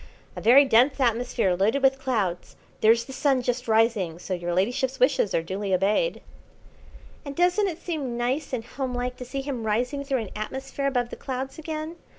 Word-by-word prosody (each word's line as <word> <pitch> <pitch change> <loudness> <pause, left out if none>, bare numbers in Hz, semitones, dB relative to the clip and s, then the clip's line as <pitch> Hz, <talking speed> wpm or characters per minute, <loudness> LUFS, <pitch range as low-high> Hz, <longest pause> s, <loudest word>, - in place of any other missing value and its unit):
"A - - -6
very 265 +5 +7
dense 260 +3 +4
atmosphere 235 -5 +1
loaded 220 +9 +1
with 270 0 +4
clouds. 210 -10 -2 0.2
There's 230 +2 +4
the 265 - -9
Sun 265 -1 +1
just 245 0 -2
rising, 220 -7 +2
so 185 - -5
your 175 -1 -3
ladyship's 245 +9 0
wishes 255 -6 +2
are 165 - +1
duly 190 +2 -1
obeyed." 210 - +1 1.0
"And 280 -1 -7
doesn't 360 +5 +3
it 340 -4 -4
seem 295 -9 -4
nice 255 +5 -1
and 235 -4 -3
homelike 250 -1 -3
to 250 - -7
see 270 +3 -4
him 265 -4 -4
rising 245 +6 -1
through 270 -3 -1
an 215 - -7
atmosphere 265 +5 -4
above 245 -3 -1
the - - -7
clouds 265 +3 -5
again? 315 +1 -5
250 Hz, 180 wpm, -25 LUFS, 220-275 Hz, 1.0 s, very